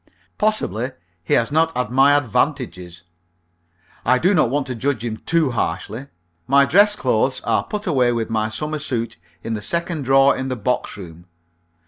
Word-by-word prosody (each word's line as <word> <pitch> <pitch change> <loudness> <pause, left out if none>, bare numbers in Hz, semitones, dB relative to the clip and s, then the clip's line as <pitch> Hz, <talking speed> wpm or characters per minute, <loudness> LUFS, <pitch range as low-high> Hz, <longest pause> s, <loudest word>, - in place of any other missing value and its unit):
Possibly 130 - -1 0.3
he - - +1
has 115 - +1
not 160 -1 +1
had 125 -3 -2
my 135 +3 +5
advantages. 90 -9 -2 1.0
I 130 - +3
do 180 +9 +2
not 155 -10 +3
want 140 +2 -1
to 130 - -4
judge 125 -1 -2
him 110 -2 -3
too 160 -5 +2
harshly. 110 +5 -3 0.4
My 140 +1 +5
dress 205 +8 +4
clothes - - 0
are - - 0
put 210 -1 -5
away 130 -8 +2
with 115 -2 -1
my 110 -1 -1
summer 150 +8 -3
suit 120 - -3 0.3
in 115 - -3
the 105 - -3
second 170 - -3
drawer 135 +1 +5
in 130 - -4
the 130 - -2
box 125 -2 -2
room. 85 -2 -11
130 Hz, 170 wpm, -20 LUFS, 115-150 Hz, 1.0 s, my